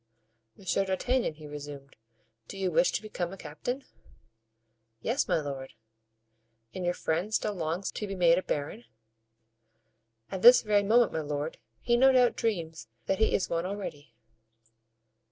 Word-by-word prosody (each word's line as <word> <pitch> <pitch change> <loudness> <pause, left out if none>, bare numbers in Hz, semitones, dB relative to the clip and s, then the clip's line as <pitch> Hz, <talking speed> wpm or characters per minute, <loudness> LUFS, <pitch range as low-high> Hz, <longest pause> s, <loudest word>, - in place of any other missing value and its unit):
"Monsieur 195 +1 0
d'Artagnan," 195 +1 0
he 155 0 -12
resumed, 145 -2 -9 0.5
"do - - -8
you 190 -2 -1
wish 260 +6 +3
to - - -2
become 180 -5 -4
a 195 - -8
captain?" 255 +7 -5 1.2
"Yes, 235 - 0
my - - +2
lord." 135 -3 -6 1.0
"And 185 - -5
your 175 0 0
friend 170 +6 -1
still 215 -1 0
longs 170 +1 -3
to 210 - -5
be 195 - -4
made 175 -1 +4
a - - -4
baron?" 145 -8 -4 1.5
"At 190 - -4
this 245 +3 +9
very 210 -2 +3
moment, 225 +3 +3
my 160 - -1
lord, 150 +1 -4 0.2
he 240 - +2
no 265 +2 +6
doubt 250 -2 +4
dreams 170 -8 -3 0.2
that 190 - 0
he 220 - +3
is 190 - 0
one 170 +1 -1
already." 150 - -7
185 Hz, 155 wpm, -29 LUFS, 155-215 Hz, 1.5 s, this